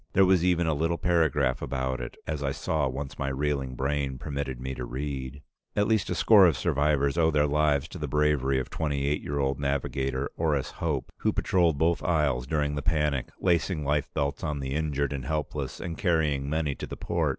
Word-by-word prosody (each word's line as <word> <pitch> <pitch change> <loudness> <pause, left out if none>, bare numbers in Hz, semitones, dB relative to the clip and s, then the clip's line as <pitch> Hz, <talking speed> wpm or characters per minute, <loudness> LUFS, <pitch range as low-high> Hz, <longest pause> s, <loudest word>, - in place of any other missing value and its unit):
There 95 - +6
was 90 -2 +4
even 90 -1 +2
a 80 - +2
little 80 +3 0
paragraph 80 -7 +2
about 65 -1 -2
it, - - -7
as 75 -2 -3
I 70 -1 0
saw 75 -1 0
once 65 +1 -5
my 70 - -1
reeling 70 -1 -1
brain 70 0 -1
permitted 70 -1 -4
me 65 +1 -4
to 65 - -5
read: 65 +1 -5 0.3
"At 105 0 +2
least 110 -3 +1
a - - -1
score 100 -4 +7
of 80 - +1
survivors 70 +1 +1
owe 80 -1 +4
their 75 -2 +3
lives 75 -1 +2
to 90 - -8
the 75 - -3
bravery 75 -2 +2
of 65 - -5
twenty 70 -3 -1
eight 75 +1 0
year 70 - -3
old 70 -1 0
Navigator 70 -1 -1
Orris 75 -5 0
Hope, 75 -5 -3
who - - +1
patrolled 85 -5 +2
both 80 +3 +2
aisles 75 -8 +1
during 75 -1 0
the 75 - -2
panic, 75 -6 0
lacing 85 -3 +1
life 75 0 0
belts 70 0 -1
on 75 -3 -2
the 65 -1 -3
injured 70 -2 -1
and 70 -2 -4
helpless, 75 -2 -3
and 85 -3 -4
carrying 75 -7 +1
many 75 -1 0
to - - -7
the - - -7
port. - - 0
75 Hz, 205 wpm, -27 LUFS, 70-80 Hz, 0.3 s, score